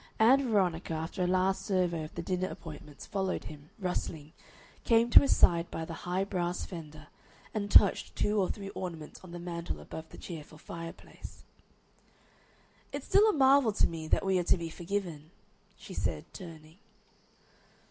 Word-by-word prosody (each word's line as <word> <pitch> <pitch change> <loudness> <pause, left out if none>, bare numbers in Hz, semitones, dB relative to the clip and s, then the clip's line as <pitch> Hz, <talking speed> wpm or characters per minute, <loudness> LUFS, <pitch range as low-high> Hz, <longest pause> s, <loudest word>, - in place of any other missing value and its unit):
Ann 255 +4 +5
Veronica, 180 -6 +1
after 160 +4 -4
a - - +1
last 185 +1 +1
survey 180 -5 0
of 155 - -9
the 170 - -4
dinner 185 +1 -1
appointments, 150 -4 -9
followed 190 -2 -2
him, 150 0 -11
rustling, 160 -5 -4 0.5
came 230 0 +3
to - - +11
his 280 - +2
side 170 -1 +4
by 160 - -4
the 165 - -7 0.2
high 185 +2 +1
brass 180 -3 -2
fender, 155 -3 -9 0.5
and 205 -2 -2
touched 205 -1 +5
two 210 0 +1
or 185 - 0
three 195 -2 -5
ornaments 170 -6 -7
on 185 - -11
the 175 - -7
mantel 170 -1 -5
above 160 0 -9
the - - -12
cheerful 155 -3 -9
fireplace. 165 +1 -10 1.5
"It's - - -5
still 425 +2 +5
a - - +2
marvel 270 - +5
to - - +3
me 160 -1 -4
that 195 - +2
we 190 -1 +3
are - - 0
to - - +4
be 165 -1 -5
forgiven," 175 -4 -4 0.5
she - - -10
said, - - -2
turning. 165 -2 -11
180 Hz, 170 wpm, -31 LUFS, 160-200 Hz, 1.5 s, to